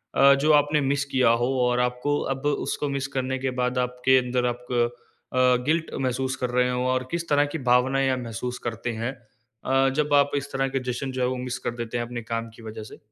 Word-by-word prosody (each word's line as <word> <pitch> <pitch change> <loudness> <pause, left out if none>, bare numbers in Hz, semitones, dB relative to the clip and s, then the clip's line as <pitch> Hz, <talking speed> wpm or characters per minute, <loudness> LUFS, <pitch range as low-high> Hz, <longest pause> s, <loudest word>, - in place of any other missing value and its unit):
अ, 140 0 +7
जो 155 - +4
आपने 145 +1 +4
मिस 140 +1 +1
किया 130 -3 +4
हो - - +3 0.2
और 125 0 +2
आपको 125 +4 0
अब 135 +1 -9
उसको 145 0 -1
मिस 140 -1 -2
करने 130 0 -1
के 130 0 -1
बाद 125 +1 0
आपके 125 +1 +2
अंदर 125 0 -1
आप 120 0 -3
क 120 -1 +2 0.4
अ, 125 0 +4
गिल्ट 160 +2 +1 0.2
महसूस 130 0 -1
कर 125 -1 -2
रहे 125 0 +2
हों 125 0 -1
और 130 0 0
किस 170 0 -2
तरह 145 0 +4
की - - -1
भावनाएँ 130 +2 +3
आप 130 - 0
महसूस 120 +1 -5
करते 115 +1 -3
हैं 120 +3 -1 0.5
अ, 135 0 +3
जब 150 0 +1
आप 145 0 +4
इस 140 +1 -5
तरह 135 0 +1
के 135 - +2
जश्न 130 +2 -4
जो 130 - -3
है, 125 - +2
वो 130 0 -2
मिस 125 0 -4
कर - - +1
देते 120 0 -4
हैं 120 - -1
अपने 120 0 -6
काम 115 0 -4
की - - -14
वजह 110 0 -7
से? 110 - -12
130 Hz, 240 wpm, -25 LUFS, 125-135 Hz, 0.5 s, अ